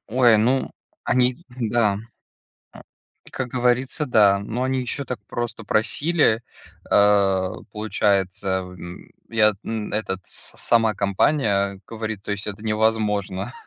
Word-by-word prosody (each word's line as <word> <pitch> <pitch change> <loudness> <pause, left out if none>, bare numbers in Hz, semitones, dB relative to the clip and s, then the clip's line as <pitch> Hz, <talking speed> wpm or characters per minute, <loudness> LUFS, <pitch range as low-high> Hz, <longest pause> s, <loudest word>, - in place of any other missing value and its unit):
Ой, 120 -1 +5
ну, 125 +5 +1 0.3
они 125 +5 +1
да, 115 -4 0 0.8
н - - -12 0.5
Как 130 -1 -3
говорится, 125 +4 0
да. 100 -5 +5
Но 115 +5 -4
они 130 0 0
ещё 135 +3 -3
так 125 - -5
просто 120 -1 -5
просили, 115 +3 +2 0.5
э, 100 -2 +4 0.2
получается, 100 -2 0
м, 90 -1 -10 0.2
я 105 -2 +4
на 110 -2 -4
этот 95 -3 -1
с - - -6
сама 115 -2 +3
компания 100 -1 +1
говорит, 110 -3 -5
то - - -7
есть 100 0 -5
это 105 +1 -6
невозможно, 105 -2 0
110 Hz, 125 wpm, -23 LUFS, 100-120 Hz, 0.8 s, Ой